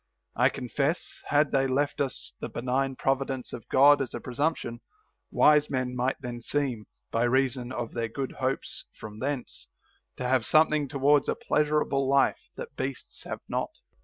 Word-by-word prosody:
I - - +4
confess, 140 +6 -2
had 145 +1 +3
they 135 0 +2
left 140 +3 0
us 135 -2 -3
the - - -5
benign 130 +2 -1
provi 135 +1 +1
dence 130 -2 -5
of 115 - -8
God 140 +2 +6
as 130 - -3
a - - -3
presumption, 125 -1 -2 0.5
wise 150 0 +5
men 130 -2 -2
might 125 +2 0
then 120 -2 -6
seem, 125 -5 -2 0.2
by 115 - 0
reason 130 0 +1
of 120 -3 -4
their 115 -1 -1
good 135 +4 -4
hopes 130 +1 -1
from 105 0 -9
thence, 135 -1 -4 0.5
to 125 - -2
have 130 -2 +2
something 155 +1 +3
towards 140 +1 +3
a - - +1
pleasurable 150 -3 +1
life 140 0 +2
that - - -8
beasts 130 0 -5
have - - -5
not. - - -2
135 Hz, 165 wpm, -28 LUFS, 125-145 Hz, 0.5 s, God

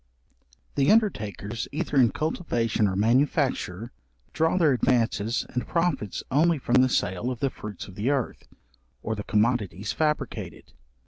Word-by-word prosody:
The 140 +3 +2
undertakers 115 - 0
either 155 0 -3
in 125 -4 +6
cultivation 120 - 0
or 95 - -2
manufacture, 120 - +1 0.4
draw 160 +3 +2
their 160 -5 +4
advances 115 -2 +1
and 125 - -3
profits 165 - -1
only 160 +4 +3
from 125 -1 +3
the 130 - +3
sale 95 0 0
of 125 -2 -4
the 135 -2 0
fruits 105 -1 -8
of 95 - -11
the 105 +7 -1
earth, 135 -4 -2 0.6
or 110 - -2
the 105 -1 -5
commodities 105 -4 0
fabricated. 150 -1 -3
125 Hz, 140 wpm, -26 LUFS, 105-145 Hz, 0.6 s, in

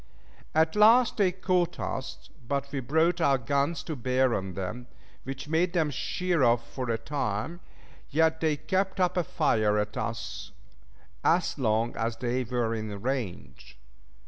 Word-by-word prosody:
At 160 +2 +3
last 225 +3 +6
they 195 -4 +3
caught 180 -1 0
us, - - -5 0.2
but 140 +1 -2
we 140 - -2
brought 160 +7 +1
our 140 -4 +4
guns 140 +5 0
to 155 +2 -4
bear 130 0 +1
on 95 -3 -3
them, 105 +7 -5 0.4
which 135 +2 -6
made 170 +3 +1
them 160 -4 +1
shear 175 +5 -1
off 120 -1 +3
for 130 -2 -3
a 115 - +1
time, 135 +4 -3 0.5
yet 160 +2 +2
they 155 -2 +1
kept 190 +6 -1
up 180 -1 +2
a 180 - +2
fire 110 -10 +1
at 105 0 -1
us 95 -4 -5 0.7
as 170 -3 +2
long 115 -1 +1
as 115 0 -2
they 125 +1 -1
were 120 -1 -1
in 110 -2 -4
range. 115 - -5
135 Hz, 155 wpm, -28 LUFS, 115-165 Hz, 0.7 s, last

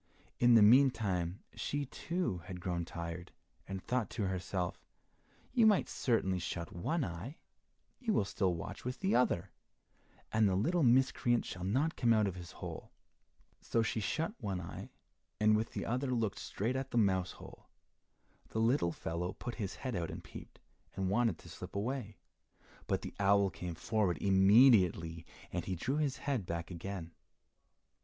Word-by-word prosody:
In 120 -1 +6
the 110 - +8
meantime 105 -7 +4
she, 145 0 -2
too, 165 - -2
had 90 -1 -7
grown 90 -1 -2
tired 85 +1 -6 0.4
and 95 -1 -4
thought 125 -2 -1
to 110 -4 -2
herself, 90 -1 -3 0.7
"You 235 -4 +6
might 210 -3 +4
certainly 95 -7 0
shut 85 -1 -4
one 145 - -1
eye, 90 - -6 0.6
you 240 -4 -1
will 105 - +2
still 95 -3 0
watch 85 - -7
with 125 +1 -5
the 190 +1 +1
other, 120 -8 +2 0.8
and 110 -2 +4
the 95 - +1
little 165 - +2
miscreant 125 -2 +3
shall 90 - -6
not 130 - +1
come 115 -1 +3
out 110 -1 +3
of 100 - -1
his 85 -1 -9
hole." - - -7 0.7
So 115 - +1
she 110 - -1
shut 160 - -1
one 100 -4 -2
eye, 85 - -7 0.5
and 110 0 +5
with 110 +2 -1
the - - -3
other 130 +3 -1
looked 115 -5 0
straight 115 +6 -2
at 135 0 -2
the - - -2
mouse 95 -4 +2
hole. - - -13 0.8
The 110 - -2
little 115 -6 +3
fellow 85 +2 -3
put 120 - -6
his 100 -2 -3
head 130 -4 -4
out 85 -2 -2
and - - -7
peeped, - - -11 0.4
and 95 0 -1
wanted 115 -3 +2
to - - -14
slip - - -9
away, 110 -1 -3 0.7
but - - 0
the - - -6
owl 100 -1 +4
came 85 0 -6
forward 105 -1 0
immediately, 95 -5 +5 0.2
and 90 - -3
he 95 - -2
drew 130 - -1
his 145 -3 0
head 130 -10 -1
back 85 +1 -4
again. 90 -1 -6
100 Hz, 165 wpm, -34 LUFS, 90-125 Hz, 0.8 s, the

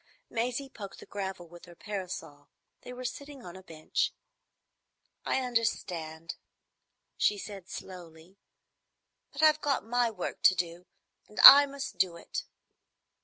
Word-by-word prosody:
Maisie 245 +4 -2
poked 205 -7 -10
the - - -12
gravel 190 -3 -6
with 175 +1 -14
her 175 -1 -15
parasol. 175 -8 -7 0.3
They - - -10
were 250 0 -8
sitting 280 +1 -7
on 175 0 -10
a 190 - -11
bench. 160 -4 -2 1.1
"I 265 - 0
understand," 175 -9 -3 0.8
she 210 - +2
said 195 -2 -9
slowly. 175 0 -11 0.9
"But 290 +2 -4
I've 310 0 +5
got 275 -7 -1
my 240 +1 +1
work 200 -5 -6
to 185 - +6
do, 175 0 -4 0.4
and 210 - -11
I 285 +1 +12
must 280 0 -7
do 175 -3 +1
it." - - -6
195 Hz, 135 wpm, -29 LUFS, 175-250 Hz, 1.1 s, I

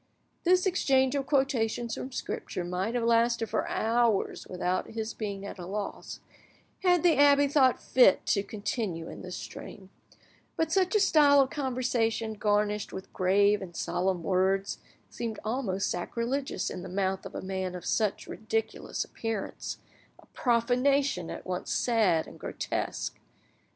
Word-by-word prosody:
This 365 +2 +4
exchange 265 -8 +2
of 275 -1 -1
quotations 240 -5 +1
from 260 - -5
Scripture 185 -6 -4
might 185 +6 -2
have 240 - 0
lasted 230 0 +2
for - - 0
hours 230 -2 +1
without 180 0 -1
his 220 0 -4
being 200 -2 -5
at 200 - -8
a 175 - -6
loss, 200 +1 -5 0.6
had 355 -3 +3
the 345 -2 +4
abbe 285 0 +6
thought 270 -3 +4
fit 245 -7 +4
to 200 - +2
continue 205 -4 -3
in - - -9
this 180 -1 -6
strain; 190 -2 -9 0.6
but 320 0 0
such 380 +2 +2
a - - +5
style 295 -7 +6
of 265 -1 +3
conversation, 245 -5 -1
garnished 210 0 0
with 190 - -8
grave 200 +3 +3
and 175 -3 -8
solemn 180 -1 -1
words, 190 +2 +1 0.3
seemed 225 -3 -5
almost 215 -5 -1
sacrilegious 235 +9 -2
in 180 - -6
the 185 - -7
mouth 190 0 -1
of - - -9
a - - -3
man 190 -1 -3
of 180 - -8
such 215 -3 0
ridiculous 445 0 -3
appearance—a 225 -3 -7
profanation 250 -3 +2
at - - -7
once 180 0 -3
sad 210 -9 +2
and - - -13
grotesque. - - -3
225 Hz, 145 wpm, -29 LUFS, 190-265 Hz, 0.6 s, abbe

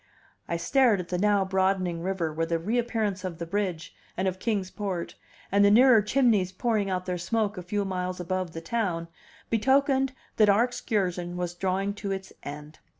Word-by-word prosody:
I 170 - -1
stared 235 +4 +3
at 180 - -6
the 180 - -1
now 205 -1 +3
broadening 190 -2 0
river, 175 -3 -2
where 165 +1 -1
the 165 0 +1
reappearance 215 0 -1
of 180 -3 -4
the 170 - -4
bridge, 185 -2 -3 0.2
and 190 - 0
of 185 0 -2
Kings 200 -4 -1
Port, 190 -5 -4 0.4
and 200 +1 +4
the 200 - +6
nearer 235 +1 +7
chimneys 210 -5 +2
pouring 210 0 0
out 185 -1 -2
their 180 -1 -2
smoke 215 +3 0
a 180 - -5
few 200 +3 -2
miles 180 -1 -3
above 180 -1 -3
the 165 - -6
town, 170 -4 -2 0.4
betokened 265 +3 +2 0.2
that 215 -2 +5
our 205 +3 +5
excursion 180 -7 -2
was 175 -1 -2
drawing 190 +2 -1
to 205 -1 -5
its 190 0 -5
end. 150 +1 -9
190 Hz, 185 wpm, -27 LUFS, 180-210 Hz, 0.4 s, nearer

